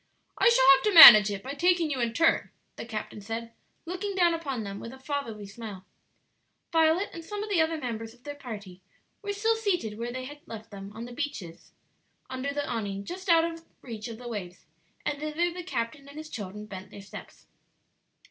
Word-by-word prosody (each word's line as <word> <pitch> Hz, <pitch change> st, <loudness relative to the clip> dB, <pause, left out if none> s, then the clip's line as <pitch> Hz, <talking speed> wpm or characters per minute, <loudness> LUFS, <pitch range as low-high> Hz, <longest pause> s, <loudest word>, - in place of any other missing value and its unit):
"I -, -, +6 dB
shall 465 Hz, -, +4 dB
have 270 Hz, -, +1 dB
to 420 Hz, -, +2 dB
manage 215 Hz, -9 st, +12 dB
it 200 Hz, -1 st, -5 dB
by 270 Hz, -, -5 dB
taking 345 Hz, +1 st, +2 dB
you 270 Hz, -, -2 dB
in 230 Hz, -1 st, -1 dB
turn," 330 Hz, 0 st, +2 dB, 0.3 s
the -, -, -8 dB
captain 215 Hz, -2 st, -6 dB
said, 225 Hz, +3 st, -6 dB, 0.3 s
looking 375 Hz, +3 st, -4 dB
down 350 Hz, -2 st, +4 dB
upon 275 Hz, -8 st, -3 dB
them 200 Hz, 0 st, -6 dB
with 230 Hz, -, -8 dB
a -, -, -11 dB
fatherly 265 Hz, -7 st, -4 dB
smile. 200 Hz, -2 st, -9 dB, 0.9 s
Violet 325 Hz, +4 st, +2 dB
and 335 Hz, -, -8 dB
some 415 Hz, +4 st, -5 dB
of 425 Hz, -, -6 dB
the 350 Hz, -5 st, +3 dB
other 320 Hz, 0 st, 0 dB
members 225 Hz, -5 st, -5 dB
of 245 Hz, -, -28 dB
their 290 Hz, -, -6 dB
party 205 Hz, -10 st, -9 dB, 0.4 s
were 410 Hz, -1 st, -3 dB
still 445 Hz, +3 st, +1 dB
seated 355 Hz, -, -2 dB
where 235 Hz, +1 st, -3 dB
they 255 Hz, +1 st, -5 dB
had 290 Hz, +2 st, -10 dB
left 220 Hz, -1 st, -9 dB
them 200 Hz, 0 st, -9 dB
on 230 Hz, -, -6 dB
the 245 Hz, -, -10 dB
benches 240 Hz, -, -6 dB, 0.6 s
under 260 Hz, +2 st, -3 dB
the 290 Hz, 0 st, -3 dB
awning 200 Hz, -4 st, -4 dB
just 375 Hz, +2 st, -7 dB
out 330 Hz, -1 st, +5 dB
of 330 Hz, 0 st, -6 dB, 0.2 s
reach 225 Hz, -3 st, -7 dB
of 230 Hz, -2 st, -8 dB
the 245 Hz, +1 st, -10 dB
waves, 185 Hz, -6 st, -7 dB, 0.4 s
and 290 Hz, -1 st, -2 dB
thither 310 Hz, +3 st, -1 dB
the 360 Hz, -, -6 dB
captain 280 Hz, -5 st, -4 dB
and 285 Hz, +1 st, -12 dB
his 310 Hz, 0 st, -8 dB
children 210 Hz, 0 st, -7 dB
bent 190 Hz, -2 st, -9 dB
their 200 Hz, -, -11 dB
steps. 195 Hz, -, -12 dB
260 Hz, 205 wpm, -28 LUFS, 215-330 Hz, 0.9 s, manage